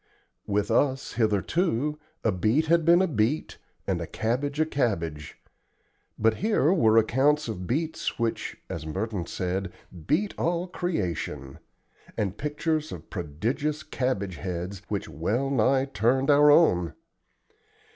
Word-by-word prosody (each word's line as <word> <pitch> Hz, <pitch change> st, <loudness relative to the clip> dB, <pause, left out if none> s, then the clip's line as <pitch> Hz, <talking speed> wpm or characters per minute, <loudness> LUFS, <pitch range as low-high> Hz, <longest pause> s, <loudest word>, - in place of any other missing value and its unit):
With 105 Hz, +2 st, 0 dB
us, 135 Hz, +3 st, +1 dB
hitherto, 125 Hz, -, 0 dB, 0.2 s
a 115 Hz, -, +3 dB
beet 110 Hz, -, +2 dB
had 170 Hz, +1 st, +3 dB
been 170 Hz, +2 st, +6 dB
a -, -, +2 dB
beet, 135 Hz, +1 st, -1 dB, 0.3 s
and -, -, -1 dB
a -, -, -4 dB
cabbage 135 Hz, +6 st, -2 dB
a 155 Hz, -, +4 dB
cabbage; 85 Hz, -, -2 dB, 0.8 s
but 110 Hz, 0 st, +2 dB
here 195 Hz, -6 st, +2 dB
were 115 Hz, -, +4 dB
accounts 135 Hz, +7 st, +3 dB
of 95 Hz, -5 st, -5 dB
beets 160 Hz, +5 st, -2 dB
which, 115 Hz, -1 st, -2 dB
as 80 Hz, -, -5 dB
Merton 95 Hz, +3 st, -3 dB
said, 95 Hz, +1 st, -3 dB, 0.4 s
"beat 185 Hz, +9 st, +1 dB
all 170 Hz, +1 st, 0 dB
creation," 85 Hz, -, -3 dB, 0.6 s
and 100 Hz, -2 st, -1 dB
pictures 155 Hz, +3 st, -2 dB
of 85 Hz, -, -9 dB
prodigious 130 Hz, -, -2 dB
cabbage 100 Hz, -, -2 dB
heads 90 Hz, +3 st, -5 dB
which 100 Hz, -2 st, -3 dB
well 115 Hz, -, -1 dB
nigh 135 Hz, +1 st, +3 dB
turned 130 Hz, +2 st, +2 dB
our 145 Hz, +1 st, +6 dB
own. 90 Hz, -, +4 dB
120 Hz, 130 wpm, -26 LUFS, 95-150 Hz, 0.8 s, been